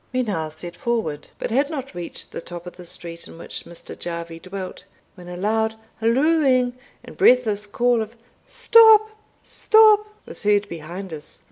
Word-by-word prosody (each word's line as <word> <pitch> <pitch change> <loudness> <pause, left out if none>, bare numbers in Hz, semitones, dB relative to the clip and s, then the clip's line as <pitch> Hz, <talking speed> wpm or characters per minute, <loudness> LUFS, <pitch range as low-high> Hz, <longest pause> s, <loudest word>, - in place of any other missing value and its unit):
We 255 0 0
now 165 -9 -2
set 170 +3 -9
forward, 230 - -2
but - - -4
had 275 +5 +2
not 275 -6 -6
reached 175 -1 -6
the - - -6
top 175 0 -9
of 180 - -9
the 180 -1 -12
street 170 0 -7
in - - -13
which - - -7
Mr. 170 - -10
Jarvie 170 -1 -6
dwelt, 185 +1 -7 0.3
when 180 -2 -13
a 175 0 -7
loud 220 +3 0 0.2
hallooing 255 +1 +3 0.3
and - - -12
breathless 215 -5 +3
call 240 +2 +1
of 220 +2 -6 0.3
"Stop, 440 -1 +6 0.3
stop!" 430 -1 +5 0.2
was - - -8
heard 205 -1 +2
behind 170 +3 -7
us. 150 -1 -9
210 Hz, 165 wpm, -22 LUFS, 175-255 Hz, 0.3 s, Stop